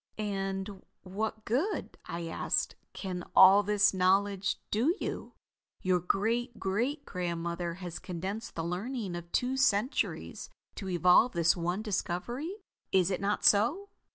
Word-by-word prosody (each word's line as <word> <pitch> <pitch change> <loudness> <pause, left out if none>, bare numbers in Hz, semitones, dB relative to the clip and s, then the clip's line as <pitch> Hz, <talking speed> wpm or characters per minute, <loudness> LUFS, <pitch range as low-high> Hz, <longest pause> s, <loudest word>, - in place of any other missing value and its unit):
"And 195 -1 -3 0.2
what 215 +3 -4
good," 295 - -1
I 170 +1 -4
asked, 165 - -1 0.2
"can 180 -3 -5
all 190 +2 +9
this 205 0 +3
knowledge 195 +1 +2
do 255 - +2
you? - - -5 0.5
Your 185 -1 +3
great 225 +6 -1
great 240 +10 -1
grandmother 170 -1 -3
has 175 -2 -7
condensed 190 +5 -5
the 165 - -2
learning 195 +3 -3
of 170 0 -8
two 255 +2 0
centuries 250 0 0 0.2
to 195 - -6
evolve 180 +7 +5
this 170 -1 +3
one 175 +4 -2
discovery. 225 - -3 0.4
Is 190 0 +3
it 185 - -2
not 205 +1 0
so?" 265 - +4
195 Hz, 130 wpm, -30 LUFS, 180-220 Hz, 0.5 s, all